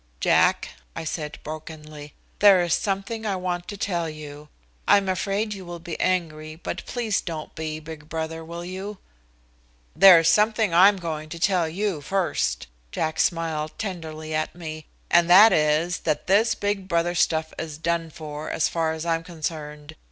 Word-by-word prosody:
"Jack," - - +3 0.3
I - - -4
said 155 -1 -4
brokenly, 155 -1 -9 0.2
"there 195 -3 +7
is 175 -1 0
something 205 +3 -2
I 205 -3 -1
want 180 -1 -3
to 205 - -6
tell 175 -4 -1
you 150 -1 -10 0.4
I'm 200 -1 +5
afraid 200 +3 -1
you 195 -2 -8
will 175 -1 -7
be 165 -1 -7
angry, 155 -4 -1
but 165 - -6
please 230 -4 -1
don't 160 -3 -6
be, 155 -1 -4
big 155 -1 -10
brother, 160 0 -4
will 170 +1 -7
you?" 190 +3 -6 1.0
"There 185 +2 +9
is 165 - +1
something 215 +1 +3
I'm 195 +4 +6
going 155 -3 -5
to 170 - -7
tell 175 -3 +2
you 190 -2 -2
first," 145 - -1 0.3
Jack 160 0 -2
smiled 160 -3 -1
tenderly 160 -6 -5
at 155 +1 -2
me, 155 -3 -8 0.2
"and 175 0 +5
that 205 +5 +9
is 155 +4 +2
that 150 -2 -1
this 205 +4 +3
big 205 -2 -2
brother 170 -1 +1
stuff 160 -2 +1
is 155 -2 -5
done 165 +1 -1
for, 150 -1 -7
as 160 - +1
far 160 -1 -1
as 160 +1 -5
I'm 165 -1 0
concerned. 155 -2 -6
165 Hz, 165 wpm, -24 LUFS, 155-185 Hz, 1.0 s, There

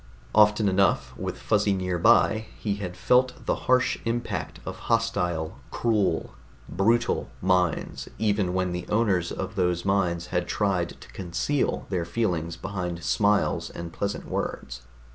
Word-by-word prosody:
Often 105 0 +5
enough, 90 -10 +2
with - - -4
Fuzzy 105 -2 +2
nearby, 95 +4 +3
he 105 -2 -2
had 90 -3 -6
felt 125 +1 +2
the - - +2 0.2
harsh 130 0 +3
impact 115 +1 -3
of - - -6
hostile, 90 -8 0
cruel, 105 -8 0 0.3
brutal 115 +6 +1
minds, 90 -2 0
even 100 -4 +1
when 90 -1 0
the 90 0 -4
owners 100 -6 +1
of 95 +2 -4
those 90 -2 0
minds 90 -4 +1
had 90 -1 0
tried 95 -4 -1
to - - -13
conceal 95 +10 -1
their 90 -3 0
feelings 85 -3 -1
behind 90 -3 -4
smiles 105 0 +2
and 85 -1 -7
pleasant 100 +3 -3
words. 65 0 -4
95 Hz, 135 wpm, -26 LUFS, 90-105 Hz, 0.3 s, Often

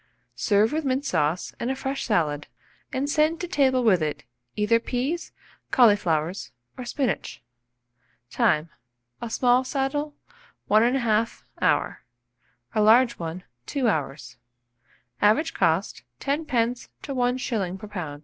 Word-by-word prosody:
Serve 210 +2 +2
with 315 +1 -1
mint 270 +1 -1
sauce 160 - 0
and 235 - -2
a 265 - 0
fresh 270 0 -3
salad, 150 -8 0 0.4
and 270 +2 -1
send 310 +2 +2
to 355 - -4
table 265 -6 +2
with 195 -7 +4
it, 150 -1 -2 0.3
either 210 +2 +3
peas, 260 +8 -3 0.4
cauliflowers, 185 - +2 0.2
or 250 - -7
spinach. 250 - -2 0.9
Time. 155 +2 +1 0.5
A 235 - -4
small 245 +2 +3
saddle, 285 +2 -2 0.5
1 215 +1 +4
1/2 230 -2 +1 0.2
hour; - - +1 0.7
a 215 - +2
large 235 +3 +5
one, 170 +2 -5 0.2
2 270 -4 0
hours. 135 - -2 0.8
Average 220 +11 +3
cost, 170 +1 0 0.2
10d. 255 -5 -1 0.2
to 280 - -4
1s. 245 -7 -1
per 210 - -9
lb. 170 -8 -6
235 Hz, 125 wpm, -25 LUFS, 185-265 Hz, 0.9 s, large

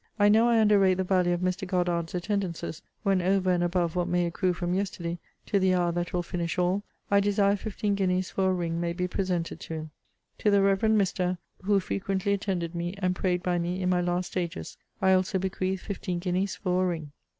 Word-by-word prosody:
I 205 -1 +5
know 225 +3 +5
I 230 -1 +4
under 210 -2 +5
rate 190 -1 +4
the 190 - 0
value 180 -1 +2
of 175 0 0
Mr. 185 +1 -1
Goddard's 175 -2 0
attendances, 180 -3 -3 0.2
when 195 -3 +2
over 185 0 +2
and 175 -1 +2
above 175 -1 0
what 175 -1 0
may 175 0 +1
accrue 180 +2 0
from 175 0 -2
yesterday, 180 -3 -2 0.3
to 200 - +1
the 185 -1 +3
hour 175 -1 +2
that 175 0 -2
will 175 -1 -1
finish 170 -1 -3
all, 180 +3 +1 0.3
I 200 - +6
desire 200 0 +3
fifteen 205 0 -2
guineas 185 -2 0
for 190 -1 +1
a - - +2
ring 170 -1 -2
may 170 0 -1
be 180 +1 -1
presented 180 -2 -2
to 165 - -6
him. 155 -1 -6 0.5
To 210 - +2
the 200 -1 +4
Reverend 205 +2 +3
Mr., 185 -2 0 0.3
who 200 0 +4
frequently 195 +1 -1
attended 185 -4 -2
me, 175 +2 -3
and 185 -2 0
prayed 180 -1 0
by 175 -1 +1
me 175 +2 -2
in 180 -1 0
my 180 -1 +2
last 175 +1 -1
stages, 180 -1 -4 0.3
I 190 0 +5
also 185 +1 +2
bequeath 190 0 -2
fifteen 185 -3 -4
guineas 185 +2 -1
for 185 -1 0
a - - +2
ring. 160 -4 -4
185 Hz, 215 wpm, -27 LUFS, 175-195 Hz, 0.5 s, I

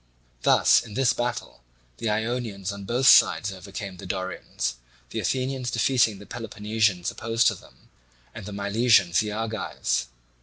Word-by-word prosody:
Thus, - - +5
in 105 -3 -11
this 130 -1 +3
battle, 120 - -4 0.4
the 115 - -2
Ionians 110 -3 -2
on 100 0 -8
both 125 +5 0
sides 95 0 +6
overcame 95 0 -8
the 90 - -9
Dorians, 95 -9 -4 0.3
the - - -3
Athenians 130 -1 -1
defeating 115 -2 +2
the 105 - -12
Peloponnesians 105 -5 -1
opposed 115 +1 0
to - - -3
them, - - -17 0.5
and 95 - -9
the - - -6
Milesians 100 -2 +3
the 105 -1 -1
Argives. 110 - -2
105 Hz, 145 wpm, -25 LUFS, 100-120 Hz, 0.5 s, sides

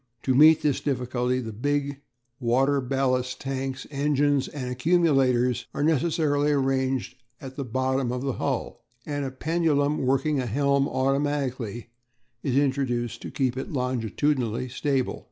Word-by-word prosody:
To 130 - +2
meet 155 +4 +6
this 145 -3 +1
difficulty 125 -2 -1
the 115 -3 -5
big 140 +4 -2 0.4
water 135 +3 +2
ballast 130 -1 0
tanks, 135 0 -4
engines 145 -1 +1
and 135 -4 -6
accumulators 130 -4 +2
are - - -1
necessarily 150 -1 +2
arranged 135 -2 0 0.2
at 130 -1 -9
the 140 - -3
bottom 130 +1 -1
of 125 +1 -3
the 135 -2 -1
hull, - - -3 0.2
and 145 -1 -3
a - - -2
pendulum 150 0 0
working 135 +2 +1
a 125 - -2
helm 140 +3 +2
automatically 130 -4 -1 0.5
is 135 -2 0
introduced 125 -4 0
to - - -6
keep 130 -3 -1
it 130 - -5
longitudinally 125 -1 -1
stable. 135 0 -1
135 Hz, 135 wpm, -26 LUFS, 125-145 Hz, 0.5 s, meet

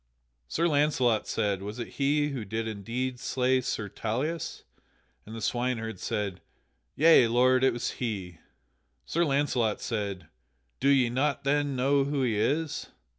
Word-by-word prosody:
Sir 170 +1 +1
Launcelot 145 -7 +2
said, 100 -2 -1
"Was 105 +3 -6
it 120 - -4
he 145 +1 +2
who 135 -5 -4
did 110 +2 -3
indeed 120 +4 -3
slay 130 0 +1
Sir 115 -4 -3
Tauleas?" 130 - -3 0.6
And 110 - -8
the 115 - -6
swineherd 115 -4 -1
said, 100 -3 -3 0.5
"Yea, 155 -5 +6
lord, 125 +2 +3
it 130 - +5
was 120 +1 -3
he." 95 -8 -4 0.7
Sir 170 - +1
Launcelot 135 -7 +1
said, 100 -5 -3 0.5
"Do 135 - +2
ye 130 -4 +4
not 140 +2 0
then 145 0 +1
know 135 +2 +2
who 140 -1 -1
he 115 -4 +1
is?" 145 +8 -1
125 Hz, 145 wpm, -28 LUFS, 110-140 Hz, 0.7 s, Yea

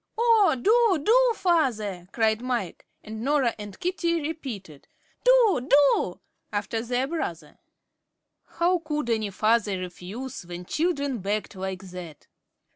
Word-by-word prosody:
"Oh, 450 - +4
do, 425 - +3
do, - - +5
father!" 220 - 0
cried 220 -1 +1
Mike, 245 -8 -3 0.2
and 220 0 -7
Norah 275 -3 +2
and 205 -2 -9
Katie 340 -2 0
repeated, 255 - -7 0.4
"Do, 460 - +4
do," 280 -10 +4 0.3
after 215 +2 -2
their 245 +2 -1
brother. 325 +3 -5 1.0
How 350 +1 +3
could 300 -6 -3
any 220 -2 0
father 215 0 +1
refuse 185 +8 -7
when 175 +1 -8
children 285 - -1
begged 205 +2 -2
like 190 0 -5
that? 175 -5 -9
245 Hz, 120 wpm, -26 LUFS, 205-335 Hz, 1.0 s, do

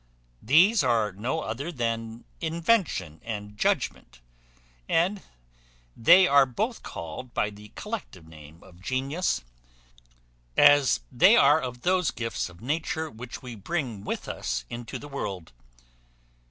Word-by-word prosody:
These 175 - +5
are 115 -4 +2
no 120 - -3
other 135 +10 -4
than 115 -4 -3
invention 165 - 0
and 105 -2 -6
judgment; 65 -10 -1 0.7
and 185 +5 +1 0.7
they 180 +10 +7
are 140 -3 +5
both 220 - -3
called 85 +8 -8
by 105 - 0
the 105 0 -14
collective 210 - -7
name 80 0 -14
of 90 -1 -17
genius, 130 - -1 1.1
as 145 - +6
they - - +6
are 145 +3 +5
of 125 -1 -6
those 180 -2 +2
gifts 115 -5 -3
of 90 +1 -16
nature 155 +3 -2
which 120 +4 -9
we 125 -2 -7
bring 115 - -4
with - - -4
us - - -3
into 120 -1 -6
the 145 - -10
world. 100 - -5
125 Hz, 125 wpm, -26 LUFS, 105-160 Hz, 1.1 s, they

